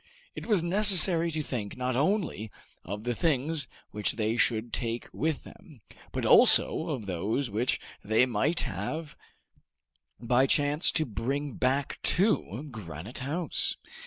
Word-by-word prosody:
It - - -8
was 205 -7 +2
necessary 180 -3 +5
to 155 -1 -3
think 115 -7 -5
not 125 0 -1
only 155 - 0 0.3
of 100 +4 -6
the 120 +1 -1
things 150 +1 -1 0.2
which 105 -1 -1
they 110 0 -1
should 115 -1 0
take 115 -1 -3
with 155 -1 -2
them, 140 -8 -15 0.3
but - - -3
also - - +5
of 110 - -3
those 100 +8 -2
which 115 +5 0 0.2
they 110 +4 +3
might 130 +8 0
have 150 - -4 1.0
by 125 +3 +2
chance 145 +3 +3
to 155 - +1
bring 135 +5 -3
back 130 +2 -1
to 165 - 0
Granite 100 - -8
House. 155 +5 -1
130 Hz, 135 wpm, -28 LUFS, 110-155 Hz, 1.0 s, necessary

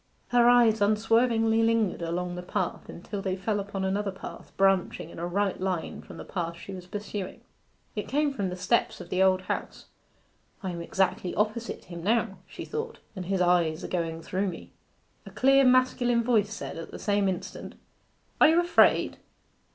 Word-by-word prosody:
Her 240 0 +5
eyes 235 -3 +5
unswervingly 225 +2 +3
lingered 225 -5 +1
along 175 +2 -2
the 180 - -5
path 180 - -3
until 195 +3 -6
they 190 -1 -1
fell 205 +2 -1
upon 195 -1 -3
another 200 +2 0
path 190 - -10
branching 195 -4 +2
in - - -10
a 170 - -2
right 195 +1 -1
line 185 -3 -2
from - - -12
the - - -8
path 170 -2 -4
she 195 - -9
was 180 -1 -9
pursuing. 205 -1 -5 0.5
It 210 - -3
came 290 +1 +1
from 200 -7 -2
the 180 - -4
steps 185 +6 0
of - - -9
the 185 - +1
Old 190 -1 +4
House. - - -4 0.8
'I 190 - -2
am 170 -1 -5
exactly 185 +1 0
opposite 215 +2 -2
him 170 -1 -8
now,' 210 -2 +1
she - - -8
thought, 455 +1 -4 0.2
'and 185 -2 -5
his 190 -1 0
eyes 175 -3 +2
are - - -3
going 165 -2 -3
through 195 +2 -1
me.' 180 - -7 0.6
A - - -6
clear 270 +1 +4
masculine 250 -2 +3
voice 220 -4 +2
said, 220 - -6
at 165 - -7
the - - -8
same 205 -1 +1
instant 180 -2 -6 0.7
'Are - - +9
you 325 +2 +5
afraid? 350 0 +3
195 Hz, 180 wpm, -27 LUFS, 180-225 Hz, 0.8 s, Are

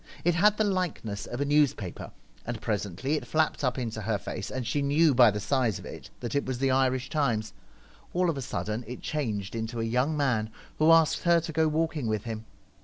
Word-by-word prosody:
It 175 - +3
had 210 +5 +4
the 215 - +3
likeness 180 - -2
of 120 +3 -4
a - - +1
news 145 -1 +3
paper, 95 -4 -7 0.3
and 120 -1 -4
presently 105 - -2
it 125 -5 -6
flapped 155 +3 +1
up 125 -1 +1
into 115 -3 -3
her 105 0 0
face, - - -6
and 130 -2 -4
she 135 +5 0
knew 145 +2 +4
by 120 -2 +7
the 105 0 -2
size 115 +1 +1
of - - -11
it - - -9
that 120 -2 -4
it 140 - +1
was 130 -1 -3
the 135 +1 +1
Irish 130 -1 +2
Ti?7ies. 120 -8 0 0.6
All 180 +1 +1
of 165 - +1
a 135 - -4
sudden 110 -1 -3
it 125 +1 -7
changed 110 -10 -2
into 115 +1 -4
a - - 0
young 125 +7 0
man, 120 -7 +1 0.3
who 155 +1 +5
asked 160 -1 +5
her 170 -1 +4
to 160 0 -6
go 160 0 +3
walking 155 -4 -1
with 110 -1 -1
him. 110 -2 -5
130 Hz, 225 wpm, -28 LUFS, 110-155 Hz, 0.6 s, by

